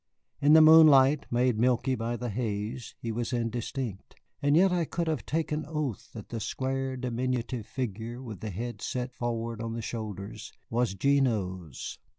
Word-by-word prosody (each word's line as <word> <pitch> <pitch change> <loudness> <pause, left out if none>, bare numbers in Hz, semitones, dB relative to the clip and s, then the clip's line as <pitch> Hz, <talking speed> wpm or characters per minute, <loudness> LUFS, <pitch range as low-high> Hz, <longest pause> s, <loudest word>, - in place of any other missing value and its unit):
In 145 +1 +6
the 160 0 +9
moonlight, 150 -3 +7
made 120 -2 +2
milky 125 +2 +2
by 120 0 -2
the 120 -1 -4
haze, 110 +2 -3
he 115 - -4
was 120 +2 -3
indistinct. 120 -2 -3 0.3
And 145 +1 +4
yet 190 +2 +5
I 175 -1 +1
could 170 +2 -2
have 155 -9 -2
taken 155 -1 -1
oath 150 - -3
that 110 -3 -9
the 115 - -4
square, 130 +3 -2
diminutive 125 -2 -2
figure, 120 -1 -4
with 115 -7 -8
the 110 - -5
head 110 +2 -5
set 125 0 -3
forward 115 -2 -3
on 115 0 -3
the 115 - -4
shoulders, 110 0 -6 0.2
was 115 -3 +1
Gignoux's. 95 - 0
120 Hz, 160 wpm, -29 LUFS, 110-135 Hz, 0.3 s, the